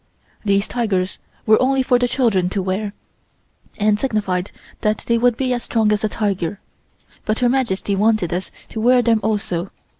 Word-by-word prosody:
These 200 -1 +1
tigers 205 -6 -1 0.3
were 215 0 +5
only 265 +1 +2
for 250 -1 +3
the 245 - +2
children 230 -8 +1
to 195 0 -2
wear, 200 +2 -2 0.8
and 210 0 +2
signified 205 -7 -1 0.3
that 215 0 0
they 235 -1 +2
would 245 -1 +3
be 255 -2 0
as 240 - -2
strong 220 -3 +1
as 210 0 0
a 215 - +1
tiger, 200 -3 -2 0.6
but 215 0 -1
Her 245 -1 +2
Majesty 230 -6 0
wanted 210 -4 +2
us 180 +2 -2 0.2
to 220 - -5
wear 245 +2 +4
them 230 -2 +3
also. 195 -4 -1
215 Hz, 175 wpm, -20 LUFS, 195-240 Hz, 0.8 s, were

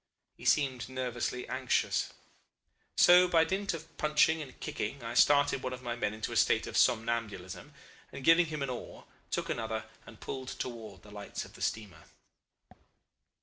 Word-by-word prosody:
He - - -13
seemed 130 -4 +2
nervously 125 -1 -3
anxious. - - 0 0.9
So 180 +1 +7
by 165 -2 +4
dint 190 +2 -1
of 165 0 -11
punching 155 +1 +3
and 135 -4 -10
kicking 140 -3 -4
I 115 +1 -4
started 145 +1 +4
one 130 - -3
of 125 0 -8
my 120 -1 -3
men 105 -3 -2
into 110 - -4
a - - -4
state - - +3
of - - -7
somnambulism, 115 -1 0 0.4
and 135 - -8
giving 165 +3 +6
him 155 -2 -4
an 135 - -2
oar, 125 - -8 0.2
took - - -2
another 110 -1 -2 0.2
and 110 - -13
pulled 130 -1 -6
towards 110 -8 -6
the 105 - -14
lights 105 -1 -6
of - - -15
the - - -13
steamer. 100 -8 -3
125 Hz, 165 wpm, -31 LUFS, 110-150 Hz, 0.9 s, So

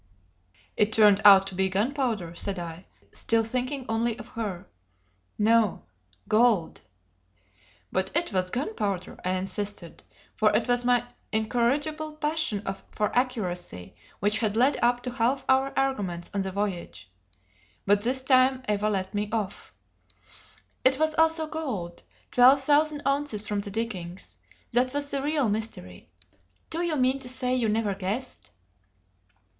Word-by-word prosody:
"It 210 +1 +2
turned 210 -2 +5
out 195 -1 +8
to 195 - -6
be 190 +1 0
gunpowder," 215 - -1
said 195 +3 -2
I, 170 +1 -7 0.3
still 225 0 +1
thinking 255 +4 -3
only 225 +1 0
of 225 -1 -10
her. 205 -6 -5 0.7
"No 220 -1 +2 0.4
gold!" 215 -6 +2 1.1
"But 190 0 -1
it 335 -8 0
was 185 -1 0
gunpowder," 210 - -3
I 185 - 0
insisted; 190 -1 -4 0.3
for - - +3
it - - +1
was 245 0 +1
my 245 -1 +2 0.3
incorrigible 285 +8 0
passion 305 - -1 0.2
for 210 - -2
accuracy 180 - -2 0.2
which 210 +3 +3
had 215 -2 0
led 260 +5 +3
up 245 0 +2
to 250 - -4
half 250 +3 0
our 265 +1 +3
arguments 205 -11 -1
on 200 - 0
the 190 0 -3
voyage; 180 - -4 0.8
but 205 +1 +3
this 260 +4 0
time 260 0 +3
Eva 210 0 +1
let 190 -2 -2
me 205 0 -2
off. 215 -4 -4 1.1
"It 260 +1 +5
was 315 +1 +1
also 320 0 +3
gold: 255 - -5 0.3
twelve 255 +2 +6
thousand 295 +1 +2
ounces 275 -7 -1
from 205 -1 -1
the 200 - -7
diggings. 190 -5 -5 0.3
That 250 +3 +1
was 285 0 -2
the 275 - 0
real 290 -2 +1
mystery. 205 - -4 0.6
Do 330 - 0
you 340 -3 0
mean 260 0 +2
to 255 -2 -4
say 250 0 0
you 240 -4 +1
never 215 -1 0
guessed?" 200 +7 -4
225 Hz, 140 wpm, -26 LUFS, 200-265 Hz, 1.1 s, out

